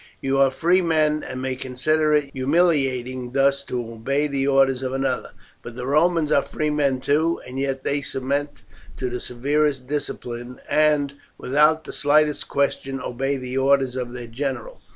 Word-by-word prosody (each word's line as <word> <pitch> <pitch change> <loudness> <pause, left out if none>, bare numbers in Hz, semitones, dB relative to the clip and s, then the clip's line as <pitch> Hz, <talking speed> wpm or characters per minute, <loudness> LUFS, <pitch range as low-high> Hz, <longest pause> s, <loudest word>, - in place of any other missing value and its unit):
You 135 0 0
are 135 -1 +5
free 170 +7 +2
men, 155 -3 +2
and 130 0 -6
may 130 -1 -2
consider 150 +5 0
it 145 -2 +2
humiliating 130 -4 +1
thus 140 0 +2
to 125 - -3
obey 135 +6 -1
the 140 -2 -1
orders 135 -2 +3
of 130 -1 -3
another; 135 -2 -1 0.3
but 120 - -9
the 125 0 -5
Romans 155 +2 +2
are 140 - +5
free 150 +1 -2
men 140 -3 +1
too, 155 +5 +1
and 125 +1 -6
yet 135 -1 -2
they 145 0 0
submit 140 +2 -2 0.5
to 125 -2 -3
the 125 - -3
severest 140 +2 0
discipline, 125 -4 -5
and 150 -2 +2 0.2
without 150 +4 +3
the - - -8
slightest 150 0 +2
question 135 -1 -1
obey 135 +2 -2
the 130 0 -3
orders 135 -1 +2
of 125 -2 -4
their 120 -1 -6
general. 135 - -5
135 Hz, 170 wpm, -23 LUFS, 130-150 Hz, 0.5 s, are